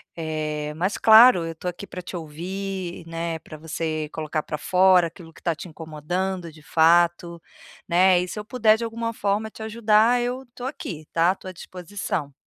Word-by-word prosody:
Eh, 155 -2 -3
mas 185 +5 -1
claro, 220 -4 +8
eu 165 - -4
estou 165 +2 -8
aqui 180 +3 -8
pra 180 - -8
te 180 - -8
ouvir, 180 +3 -5
né, 165 0 -4
pra 155 - -11
você 155 0 -3
colocar 155 0 -2
pra 150 - -5
fora 180 +2 +4
aquilo 165 -1 -13
que - - -17
está 170 - 0
te 160 - -9
incomodando 170 +3 -4
de 155 -1 -16
fato, 170 +1 +3 0.5
né. 180 +1 +5
E 180 - -4
se 210 - -5
eu 210 - -7
puder 220 -3 +3
de 230 - -3
alguma 230 0 -3
forma 210 +1 -1
te 220 - -12
ajudar 220 +2 +3
eu 250 +2 -3
tô 245 - -9
aqui 180 - -6
tá, 170 +3 +3
tô 190 - -10
a - - -6
disposição. 180 -4 -5
175 Hz, 190 wpm, -24 LUFS, 160-205 Hz, 0.5 s, claro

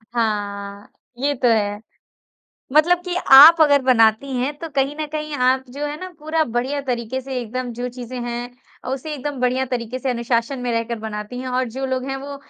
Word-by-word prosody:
हाँ, 205 -2 -3 0.3
ये 285 +2 +1
तो 245 0 +1
है। 205 -2 +1 0.9
मतलब 340 +4 +4
कि 360 -1 -3 0.2
आप 315 +5 +10
अगर 285 -3 +5
बनाती 245 +1 +3
हैं, 255 +4 -1
तो 330 - -6
कहीं 275 0 -1
न 305 - -2
कहीं 305 -1 -4
आप 260 0 +2
जो 285 +3 -5
हैं 295 0 -4
ना 370 - -6
पूरा 315 +1 0
बढ़िया 250 +5 -2
तरीके 240 +2 -3
से 265 0 -6
एकदम 245 +1 -5
जो 245 +2 -4
चीज़े 250 0 -8
हैं 240 +1 -4 0.3
अ, - - -6
उसे 270 +4 -4
एकदम 285 -1 -5
बढ़िया 255 +1 +1
तरीके 245 0 -4
से 265 -1 -2
अनुशासन 235 +2 -1
में 245 - -2
रहकर 230 0 -2
बनाती 215 +2 -6
हैं, 255 0 -5
और 255 +1 0
जो 265 +4 -4
लोग 260 -1 -2
हैं, 270 - -2
वो 280 +1 -7
255 Hz, 200 wpm, -21 LUFS, 235-280 Hz, 0.9 s, आप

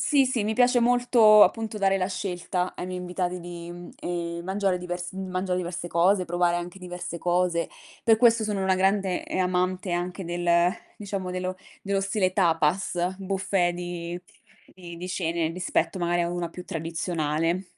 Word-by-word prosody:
sì, 280 -3 +3
sì, 245 -4 0
mi 215 - 0
piace 245 +1 +4
molto 235 -3 +6
appunto 220 -1 +2
dare 195 -1 +3
la 185 -1 0
scelta 180 -1 -3
ai - - -4
miei 185 0 -4
invitati 180 0 -3
di, 175 0 -8
mhmm, 175 0 -10
ehm, 170 -1 -3
mangiare 190 0 0
divers 175 0 -5
mangiare 185 -1 -2
diverse 175 -1 -4
cose, 180 +3 +3
provare 175 0 +1
anche 175 +2 -6
diverse 180 -1 -6
cose. 175 -1 +1 0.4
Per 225 -2 +5
questo 230 -1 +5
sono 205 -2 -1
una 190 0 +3
grande, 190 -1 +1
ehm, - - -2
amante 185 +1 0
anche 180 +2 -2
del 175 +1 -3 0.5
diciamo 195 -3 -4
dello 185 0 -3 0.3
dello 195 0 0
stile 195 -2 +1
tapas, 175 +1 +1
buffet 190 -2 0
di 175 0 -5 0.5
di 175 -2 -10
di 180 - -6
cene 170 -3 -1
rispetto 175 0 -1
magari 175 0 +1
a 170 - 0
una 175 -1 -3
più 180 +1 -9
tradizionale. 165 +1 -1
180 Hz, 165 wpm, -26 LUFS, 175-195 Hz, 0.5 s, molto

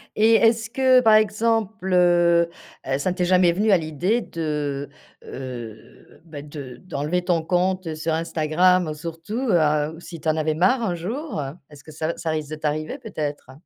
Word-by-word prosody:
Et 225 +1 +5
est-ce 225 0 +3
que, 255 +1 +4
par 220 -2 +5
exemple, 215 -2 +1
heu, 175 -1 +4 0.5
ça 180 +6 -1
ne - - -4
t'est 180 - 0
jamais 180 -1 +4
venu 210 +5 +1
à 190 - +6
l'idée 170 +8 -1
de, 150 -6 -3 0.3
heu, 120 -4 -9
bah, 155 -3 -8
de 145 -4 -9
d'enlever 175 +2 -3
ton 175 -2 +1
compte 180 0 0
sur 160 +1 -2
Instagram, 165 +1 +2
surtout, 165 +8 -6
heu, 155 -3 +2
si 175 -1 -10
tu 155 - -7
en 155 - +3
avais 155 0 0
marre 190 +10 +3
un 180 -5 -1
jour? 225 - -4 0.3
Est-ce 145 -2 -15
que 155 - -12
ça 155 +1 -3
v - - -1
ça 160 - -2
risque 155 -2 -3
de - - -3
t'arriver 155 - -3
peut-être? 150 - -5
170 Hz, 175 wpm, -23 LUFS, 155-190 Hz, 0.5 s, à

